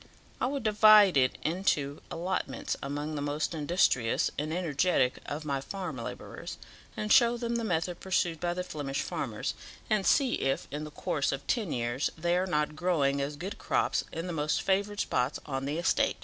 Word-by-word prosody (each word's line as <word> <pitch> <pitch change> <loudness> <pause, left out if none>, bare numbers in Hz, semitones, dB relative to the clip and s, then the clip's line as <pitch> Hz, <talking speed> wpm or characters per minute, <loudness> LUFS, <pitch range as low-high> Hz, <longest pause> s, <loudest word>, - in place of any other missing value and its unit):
I - - +2
would 275 -1 -3
divide 215 -3 +7
it 130 -2 +3
into 155 -4 0
allotments 180 +2 -2
among 145 +2 -3
the 145 - -3
most 145 +3 -1
industrious 150 -7 +2
and 150 +2 -3
energetic 165 -5 +1
of 150 +2 -4
my 140 -2 -1
farm 180 -1 -5
labourers, 115 - -7 0.4
and 210 0 +2
show 240 -2 +5
them 235 0 -1
the 230 - -2
method 175 -3 -1
pursued 175 -3 0
by 175 +1 -1
the 180 - -2
Flemish 140 -5 -3
farmers, - - -3 0.4
and 210 -2 +3
see 260 +4 +3
if 135 0 -1
in 150 +2 -4
the - - -7
course 145 -1 -1
of 135 - -4
ten 215 -9 0
years 120 +3 -1
they 170 +2 +1
are 185 +1 +1
not 150 -3 0
growing 145 -6 +1
as 140 +2 -3
good 180 +7 -6
crops - - +1
as - - -5
in - - -7
the 180 - -4
most 150 -1 0
favoured 200 +2 +1
spots 125 +3 0
on 135 -2 -3
the 145 +3 -2
estate. 170 - +2
160 Hz, 190 wpm, -30 LUFS, 145-190 Hz, 0.4 s, divide